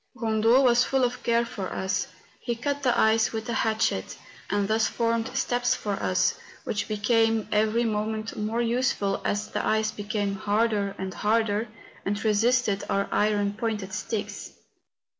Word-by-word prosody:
Kondo 225 +1 +3
was 240 -1 +5
full 265 0 +1
of 245 0 -1
care 235 0 +2
for 195 -5 -5
us. 190 +2 -1 0.4
•He 235 -1 -1
cut 285 +2 -2
the 255 -3 +2
ice 220 0 +3
with 220 -1 -4
a - - -1
hatchet, 220 - 0 0.3
and 205 0 +1
thus 220 +1 +2
formed 230 -1 0
steps 245 -1 +1
for 210 - -4
us, 185 -2 +1 0.3
which 205 - -2
became 225 +1 +2
every 215 +2 +2
moment 215 0 -2
more 220 +3 -1
use¬ 240 +2 +1
ful 195 -1 -1
as 205 +1 -1
the - - -2
ice 215 0 +1
became 205 -1 -2
harder 205 0 0
and 190 0 -4
harder 220 0 +1 0.4
and 205 +2 -2
resisted 220 -1 +2
our 200 0 0
iron 205 -1 +1
pointed 210 -3 -3
sticks. 200 +3 -4
220 Hz, 160 wpm, -26 LUFS, 205-230 Hz, 0.4 s, was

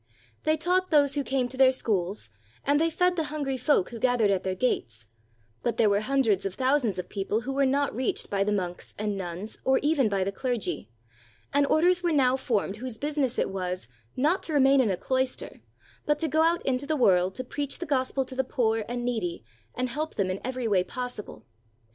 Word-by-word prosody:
They 310 0 +3
taught 365 +3 +1
those 285 -3 +4
who 285 0 0
came 265 -2 0
to 260 - -8
their 260 -1 +6
schools, 200 - -1 0.3
and 290 +2 +3
they 330 - +3
fed 360 +2 +1
the 325 -3 0
hungry 290 -3 -2
folk 255 -6 +2
who 235 - -7
gathered 240 -4 +3
at 190 -2 0
their 185 0 -2
gates; 115 - -1 0.6
but 235 -2 -1
there 215 -3 +4
were 200 - +3
hundreds 225 -4 +1
of 195 -1 -4
thou 260 +2 +3
sands 225 -8 -2
of 180 -1 -4
people 205 +2 -2
who 270 +3 -4
were 275 0 +2
not 280 -1 0
reached 255 0 -1
by 200 -1 0
the 210 - -1
monks 180 -3 -3
and 210 -1 -2
nuns 185 +2 -5
or 265 0 +3
even 290 -6 +3
by 195 -2 0
the 195 - -2
clergy; 200 - -3 0.6
and 285 0 +3
orders 355 +4 +3
were 350 -1 +1
now 260 -4 +3
formed 210 -6 -1
whose 245 -1 -6
business 285 -3 -1
it - - 0
was, 180 -6 -4 0.3
not 310 +8 +2
to 320 - -4
remain 275 -1 +5
in 235 - +1
a 185 - 0
cloister, 260 +5 -2 0.5
but 295 0 +3
to 320 - -1
go 315 +2 +2
out 335 +1 +2
into 265 +1 0
the 310 0 0
world 185 -6 +3
to 255 - -3
preach 285 +2 -4
the 350 - -5
gospel 270 -2 0
to 260 - -7
the 265 0 0
poor 225 -3 0
and 245 0 -3
needy 185 - -2 0.3
and 255 0 -1
help 305 +5 -3
them 190 -2 0
in 185 - -4
every 255 -1 -2
way 195 -4 +3
possible. 250 -1 -7
255 Hz, 220 wpm, -27 LUFS, 200-285 Hz, 0.6 s, their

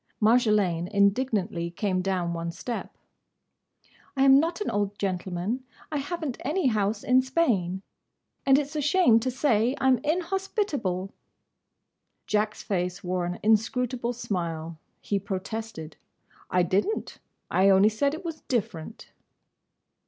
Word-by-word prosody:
Marjolaine 210 -7 +3
indignantly 200 -4 +1
came 185 +1 -1
down 180 -2 -1
one 170 0 -3
step. 235 +7 -6 1.2
"I 270 - +4
am 270 0 +7
not 335 +4 -1
an 420 - -2
old 205 0 -1
gentleman; 190 +5 -2 0.3
I 300 - -1
haven't 290 -2 -3
any 305 +6 0
house 215 -3 +1
in 255 +1 +4
Spain; 210 - 0 0.6
and 270 -1 +5
it's 295 +1 -2
a 300 - 0
shame 300 - +4
to 255 +3 -1
say 250 -2 +2
I - - -1
'm 260 -2 +5
inhospitable!" 320 - -1 1.1
Jack's 210 0 -1
face 180 -2 -2
wore 180 -1 -1
an 175 - -4
inscrutable 240 +3 +1
smile. 170 -7 -4 0.2
He 200 - -1
protested. 195 -3 -5 0.5
"I 180 -1 +3
didn't. 195 - -1 0.3
I 190 +1 +4
only 195 +2 +6
said 280 +7 0
it 350 +3 -10
was 325 -2 -5
different." 215 -5 -3
215 Hz, 130 wpm, -27 LUFS, 185-265 Hz, 1.2 s, am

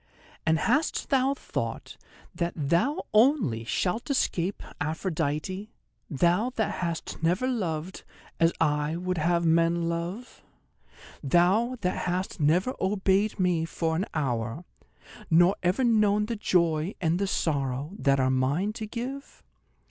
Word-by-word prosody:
And 160 0 +4
hast 295 - 0
thou 270 0 +3
thought - - -5 0.4
that 170 0 -2
thou 170 - 0
only 215 - +3
shalt 185 - -1
escape 195 -8 0 0.2
Aphrodite? 160 +4 -2 0.4
Thou 175 - +2
that 220 - 0
hast 170 -2 -4
never 180 +10 +1
loved 185 -8 -3 0.4
as 165 0 +4
I 150 0 +1
would 180 0 -2
have 170 +2 +1
men 165 +1 +2
love; 175 +9 -5 0.8
thou 185 - +2
that 180 0 -1
hast 180 +2 -2
never 170 - +2
obeyed 195 +2 +1
me 180 -3 +2
for 165 0 -2
an 185 +6 -1
hour, 125 +1 -2 0.6
nor 175 +4 +5
ever 185 +8 +1
known 210 -3 +3
the 230 +2 -3
joy 170 -4 +1
and 170 0 +1
the 200 - 0
sorrow 140 -4 -1
that 140 -1 +2
are 130 0 +2
mine 140 +11 0
to 215 -1 -6
give? 255 +5 -7
175 Hz, 130 wpm, -27 LUFS, 160-210 Hz, 0.8 s, nor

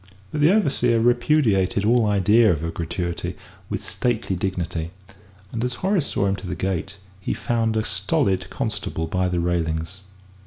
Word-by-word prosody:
But 150 - -2
the 155 +4 +6
overseer 130 - +2
repudiated 115 -5 +2
all 115 0 +4
idea 105 +2 +4
of 80 -2 -1
a 85 - -2
gratuity 85 +1 -3 0.3
with - - -3
stately 115 -6 -1
dignity, 90 -3 -2 0.6
and 115 0 -2
as 125 0 -1
Horace 190 -6 +2
saw 100 - 0
him 95 0 +1
to 95 - -8
the - - -3
gate, 95 +1 -3 0.2
he 95 - -2
found 115 -2 0
a 110 - +1
stolid 95 -2 0
constable 80 - -3
by 90 +3 0
the 90 -1 0
railings. 85 +1 -1
100 Hz, 160 wpm, -23 LUFS, 90-120 Hz, 0.6 s, the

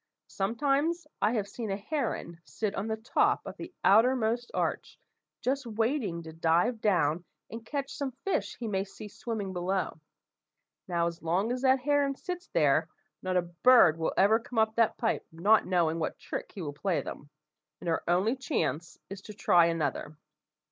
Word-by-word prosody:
Sometimes 285 - 0 0.2
I 210 +3 +3
have 210 -4 -1
seen 220 +1 -6
a 195 - -1
heron 215 - -3
sit 210 +2 -3
on 200 - -3
the 220 0 -2
top 220 +2 +1
of - - -7
the 345 - -8
outermost 235 +2 +3
arch, - - -2 0.4
just 270 0 -1
waiting 225 - -1
to 160 0 -9
dive 170 +9 +1
down 175 -5 +2 0.3
and 225 +1 -7
catch 275 +3 -4
some 280 -3 -3
fish 390 - -1
he 235 - -4
may 195 -2 0
see 205 +2 -10
swimming 210 -2 -5
below. 180 -1 -2 0.9
Now 170 -1 +1
as 170 0 -4
long 180 +8 0
as 250 0 -2
that 260 0 +4
heron 285 0 +2
sits 360 +5 -6
there, - - +2 0.3
not 185 -1 0
a 180 - +2
bird 175 -1 +5
will 160 - -1
ever 215 +4 +5
come 235 +1 -9
up 220 0 +3
that 230 -2 +2
pipe, 225 - 0
not 200 +7 +3
knowing 170 -3 +1
what 160 - -2
trick - - -6
he 190 - -7
will 145 -2 -4
play 175 +4 -1
them, 145 - -8 0.5
and - - -8
our 165 - 0
only 185 +8 +2
chance 175 - -2
is 195 -1 -7
to 210 +1 -10
try 175 -4 +4
another. 155 -2 -2
210 Hz, 175 wpm, -29 LUFS, 175-245 Hz, 0.9 s, bird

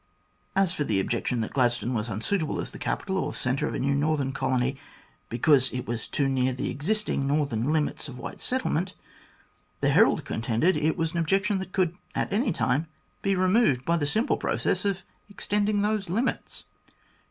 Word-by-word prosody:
As 190 -3 +3
for 150 - -1
the 105 -8 0
objection 120 +4 -1
that 110 - -4
Glad 120 -3 +3
stone 120 +1 -3
was 110 0 -2
unsuitable 150 - -1
as - - -3
the - - -9
capital 190 -1 -1
or - - -3
centre 125 +2 -1
of - - -3
a - - -2
new 140 +1 +1
northern 145 -1 +1
colony, 130 0 0 0.5
because 130 +2 +3
it 125 0 -4
was 115 -1 -3
too 140 - 0
near 130 -1 +1
the 125 - -3
existing 170 -2 0
northern 140 -3 0
limits 155 -1 0
of 130 -3 -9
white - - -7
settlement, 185 -8 -1 0.8
the - - +2
Herald - - +4
contended 115 +11 +1
it 155 +3 +1
was 165 -2 0
an 170 - -4
objection 195 +5 +1
that 190 0 -6
could 180 -3 +1 0.2
at - - -1
any 225 +2 +2
time 145 +3 0 0.3
be 195 -1 +1
removed 185 - +3
by 170 - +2
the 145 -4 0
simple 220 - +2
process - - 0
of 195 -2 -1 0.3
extending 205 0 0
those 210 -3 0
limits. 230 +9 -2
150 Hz, 185 wpm, -27 LUFS, 130-190 Hz, 0.8 s, Herald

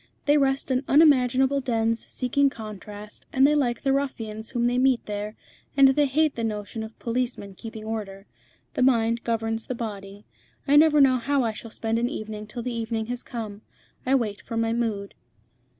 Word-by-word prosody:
They 290 - +4
rest 270 -1 +1
in 255 +1 +1
unimaginable 270 -2 +4
dens 230 -2 0
seeking 275 +2 +1
contrast, 210 -2 -9
and 265 0 +4
they 295 - +5
like 250 -5 0
the 270 - +2
ruffians 225 -6 -3
whom 240 -2 0
they 245 +1 +2
meet 260 -2 +2
there, 210 +1 -4 0.4
and 275 -1 +8
they 285 +2 +3
hate 305 +2 +2
the 230 - -4
notion 215 0 -3
of 220 0 -8
policemen 235 -4 -3
keeping 220 +1 -9
order. 205 -3 -5 0.5
The - - -2
mind 235 -2 +3
governs 225 -1 -2
the 255 - -3
body. 205 -3 -7 0.4
I 285 - +4
never 300 -1 +6
know 260 -2 +5
how 275 +2 +1
I 225 -2 -1
shall 225 +2 -9
spend 225 +1 -2
an 240 +1 0
evening 215 -6 -6
till 235 +3 -6
the 250 0 -3
evening 225 -1 -2
has 245 - -5
come. 215 -3 -7 0.4
I 265 +2 +2
wait 215 -6 -1
for 230 - -6
my 225 0 +1
mood." 220 -4 -2
235 Hz, 185 wpm, -25 LUFS, 220-265 Hz, 0.5 s, and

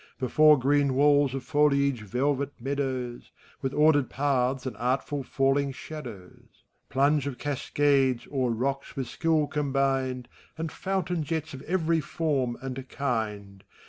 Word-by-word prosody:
Before 150 +4 +5
green 140 +1 +2
walls 145 -1 +4
of 135 - -4
foliage 140 -4 +2
velvet 135 +6 -1
meadows. 130 -2 -3 0.3
With 135 -2 -1
ordered 145 -2 +3
paths 135 -2 0
and 130 - -4
artful 130 +4 -1
falling 135 +1 +1
shadows; 120 -13 -10 0.3
Plunge 140 +1 +2
of 135 -3 -4
caseades 140 -2 +1
o'er 130 -3 +1
rocks 135 +4 -2
with 135 - -2
skill 160 +4 +1
combined, 135 -3 -1 0.3
And 160 -1 -3
fountain 190 -3 -2
jets 160 0 -3
of 135 - -8
every 165 -2 +1
form 140 -6 -1
and 130 0 -6
kind. 105 -7 -3
140 Hz, 130 wpm, -27 LUFS, 130-145 Hz, 0.3 s, Before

